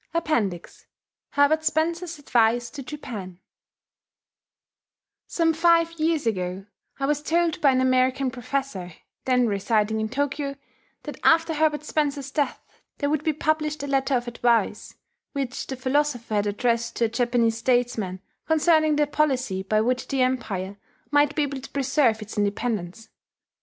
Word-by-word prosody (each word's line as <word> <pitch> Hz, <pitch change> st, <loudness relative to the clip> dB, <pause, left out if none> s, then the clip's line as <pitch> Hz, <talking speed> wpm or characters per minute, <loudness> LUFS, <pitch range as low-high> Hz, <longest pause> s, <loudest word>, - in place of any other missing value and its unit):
APPENDIX 230 Hz, -, -2 dB, 0.5 s
HERBERT 300 Hz, +2 st, +3 dB
SPENCER'S 330 Hz, +2 st, -1 dB
ADVICE 240 Hz, -3 st, +1 dB
TO 290 Hz, -, -7 dB
JAPAN 230 Hz, -10 st, -7 dB, 1.9 s
Some 330 Hz, -1 st, +1 dB
five 335 Hz, 0 st, +4 dB
years 315 Hz, -3 st, +1 dB
ago 185 Hz, -3 st, -2 dB, 0.3 s
I 275 Hz, -, 0 dB
was 295 Hz, +1 st, 0 dB
told 335 Hz, +1 st, 0 dB
by 285 Hz, -, +5 dB
an 260 Hz, -1 st, +3 dB
American 255 Hz, +1 st, +2 dB
professor, 245 Hz, -, -4 dB, 0.3 s
then 250 Hz, -1 st, +3 dB
residing 215 Hz, +1 st, 0 dB
in 220 Hz, -, -2 dB
Tokyo, 280 Hz, +2 st, -2 dB, 0.5 s
that -, -, -8 dB
after 325 Hz, 0 st, +4 dB
Herbert 300 Hz, -1 st, +1 dB
Spencer's 285 Hz, -3 st, -1 dB
death 290 Hz, -1 st, -1 dB, 0.4 s
there 285 Hz, -1 st, -1 dB
would 305 Hz, -1 st, 0 dB
be 315 Hz, -, +2 dB
published 305 Hz, -1 st, -1 dB
a -, -, -3 dB
letter 270 Hz, 0 st, +1 dB
of 240 Hz, 0 st, -1 dB
advice, 235 Hz, -1 st, 0 dB, 0.4 s
which 270 Hz, -3 st, -3 dB
the 265 Hz, -, -4 dB
philosopher 260 Hz, -3 st, -1 dB
had 205 Hz, 0 st, +1 dB
addressed 235 Hz, +3 st, 0 dB
to 235 Hz, -, +2 dB
a -, -, -1 dB
Japanese 235 Hz, -1 st, +1 dB
statesman, 235 Hz, -7 st, 0 dB, 0.3 s
concerning 315 Hz, -1 st, +3 dB
the 295 Hz, 0 st, +3 dB
policy 260 Hz, -9 st, 0 dB
by 215 Hz, +3 st, +1 dB
which 250 Hz, +3 st, 0 dB
the 270 Hz, -2 st, +1 dB
Empire 200 Hz, -7 st, -2 dB, 0.3 s
might 290 Hz, 0 st, +3 dB
be 300 Hz, -, +2 dB
able 275 Hz, -2 st, -4 dB
to 270 Hz, -, -10 dB
preserve 265 Hz, -5 st, +1 dB
its 215 Hz, 0 st, -6 dB
independence. 205 Hz, -1 st, -2 dB
260 Hz, 145 wpm, -24 LUFS, 225-300 Hz, 1.9 s, by